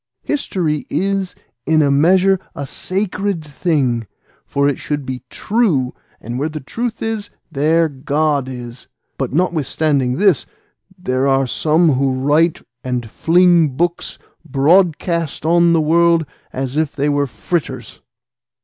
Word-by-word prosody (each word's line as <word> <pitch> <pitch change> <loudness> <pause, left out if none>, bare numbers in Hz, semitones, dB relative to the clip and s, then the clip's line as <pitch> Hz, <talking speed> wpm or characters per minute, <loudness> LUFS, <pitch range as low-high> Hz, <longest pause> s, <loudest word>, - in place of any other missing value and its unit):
History 170 - -2
is 195 -1 -1 0.3
in 155 -1 +4
a 140 - +2
measure 185 +6 +4 0.2
a 140 - -4
sacred 190 +2 -3
thing, 140 - -1 0.4
for 140 0 +1
it 145 - -1
should 145 -2 -3
be 130 -1 -5
true, 185 - 0 0.3
and 120 +3 -5
where 150 +3 -1
the 155 0 -6
truth 230 - -4
is, 220 -2 -3 0.2
there 160 +3 +2
God 145 -1 -1
is; 120 -1 -9 0.3
but - - -2
notwithstanding 150 -4 0
this, 190 0 +2 0.5
there 130 -6 -1
are 135 0 +3
some 160 +6 +2
who 135 0 +1
write 150 +5 +2 0.2
and 125 -2 -3
fling 170 -4 +3
books 175 +1 -1 0.3
broadcast 165 +1 +1
on 170 +1 +4
the 165 - +3
world 165 +1 +3 0.3
as 135 +2 -4
if 155 -2 0
they 145 0 0
were 145 -1 +1
fritters." 130 -3 -4
155 Hz, 130 wpm, -18 LUFS, 135-175 Hz, 0.5 s, in